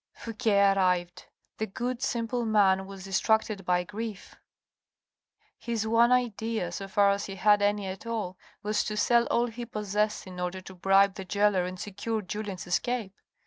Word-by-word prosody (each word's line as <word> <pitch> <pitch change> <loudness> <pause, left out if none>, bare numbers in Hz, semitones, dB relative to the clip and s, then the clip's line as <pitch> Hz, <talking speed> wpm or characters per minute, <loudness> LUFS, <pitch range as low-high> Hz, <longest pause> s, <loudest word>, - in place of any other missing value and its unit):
Fouque 230 +1 -6
arrived. 185 -3 +2 0.3
The 220 - -1
good, 245 +4 -4
simple 240 -2 -1
man, 195 -4 +3
was 195 -1 -9
distracted 205 +1 +1
by 180 0 +2
grief. 210 +1 -7 1.2
His 230 -2 -2
one 230 +2 +4
idea, 225 -6 0
so 195 +2 -5
far 200 +1 +4
as 200 0 -1
he 195 - -6
had 205 +2 +4
any 205 0 +1
at 190 +4 -6
all, 215 -6 -3 0.3
was 210 0 +1
to 215 - -3
sell 235 +2 +3
all 235 - +2
he 240 0 -6
possessed 210 -2 -2
in 185 -1 -9
order 180 +1 -3
to 185 +1 -11
bribe 195 +2 +4
the 195 -1 -7
gaoler 200 -1 +2
and 185 0 -6
secure 215 +1 -3
Julien's 205 -1 -5
escape. 210 +2 -1
205 Hz, 165 wpm, -28 LUFS, 190-225 Hz, 1.2 s, one